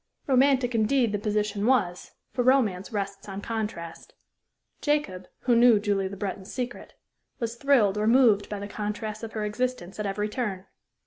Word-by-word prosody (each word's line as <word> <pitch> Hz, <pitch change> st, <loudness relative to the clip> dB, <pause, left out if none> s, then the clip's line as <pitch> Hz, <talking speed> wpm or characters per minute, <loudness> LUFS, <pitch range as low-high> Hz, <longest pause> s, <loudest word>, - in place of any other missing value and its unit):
Romantic, 260 Hz, -2 st, +3 dB
indeed, 230 Hz, +1 st, +2 dB
the 205 Hz, -, -1 dB
position 210 Hz, 0 st, -1 dB
was, 195 Hz, -9 st, +1 dB, 0.2 s
for 250 Hz, -, 0 dB
romance 240 Hz, -8 st, +2 dB
rests 200 Hz, -1 st, -4 dB
on 195 Hz, 0 st, -5 dB
contrast. 210 Hz, -7 st, -5 dB, 0.7 s
Jacob, 200 Hz, -12 st, -1 dB
who 245 Hz, -1 st, +3 dB
knew 235 Hz, -2 st, +6 dB
Julie 200 Hz, -2 st, 0 dB
Le 200 Hz, -, -7 dB
Breton's 195 Hz, 0 st, -5 dB
secret, 245 Hz, -1 st, -5 dB, 0.4 s
was 230 Hz, -1 st, -3 dB
thrilled 235 Hz, -7 st, +3 dB
or 215 Hz, -, +1 dB
moved 225 Hz, -4 st, +4 dB
by 210 Hz, -, -4 dB
the 200 Hz, 0 st, -6 dB
contrasts 210 Hz, +1 st, -4 dB
of 225 Hz, -1 st, -7 dB
her 215 Hz, -1 st, -2 dB
existence 210 Hz, -4 st, -3 dB
at 210 Hz, -, -1 dB
every 205 Hz, +2 st, -1 dB
turn. 210 Hz, -5 st, -3 dB
210 Hz, 165 wpm, -26 LUFS, 200-245 Hz, 0.7 s, knew